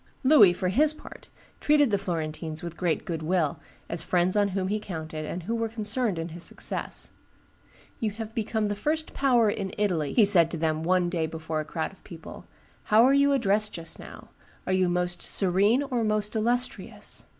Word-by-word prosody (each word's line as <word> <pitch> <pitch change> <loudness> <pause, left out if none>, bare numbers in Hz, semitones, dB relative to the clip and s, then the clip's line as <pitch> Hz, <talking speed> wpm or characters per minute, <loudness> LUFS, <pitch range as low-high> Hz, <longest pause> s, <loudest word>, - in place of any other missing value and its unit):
Louis, 260 - +7
for 180 +1 -2
his 295 +10 +3
part, - - -13 0.3
treated 295 -4 +3
the 200 - +3
Florentines 160 -3 -4
with 170 -1 -6
great 170 -3 -1
good 165 -2 -4
will, 160 -2 0 0.3
as 170 - 0
friends 180 +1 +1
on 205 -1 +3
whom 185 -1 -1
he 210 +1 0
counted 160 -5 -6
and 175 +3 -5
who 225 +7 -2
were 230 -1 -1
concerned 220 -2 0
in 165 +1 -4
his 170 +1 -7
success. - - -3 0.9
"You 220 - 0
have 220 +1 -7
become 220 -1 -1
the 205 - -2
first 310 +9 -2
power 245 -5 +3
in 200 -2 -3
Italy," 180 -8 0
he 225 - +5
said 175 -5 +5
to 170 - -5
then 155 -1 -1
one 180 +1 +2
day 165 -3 -1
before 160 0 -4
a 155 - -3
crowd 160 +1 -3
of 195 - -22
people: 165 -2 -11 0.4
"how 215 +2 +5
are 265 +2 +5
you 280 0 +4
addressed 215 -5 +1
just 165 -1 -7
now? - - -12 0.4
Are 185 - -1
you 185 -1 +2
Most 175 0 -2
Serene 200 +7 +2
or 250 -4 -2
Most 215 0 0
Illustrious?" 240 +3 -2
195 Hz, 195 wpm, -26 LUFS, 170-225 Hz, 0.9 s, Louis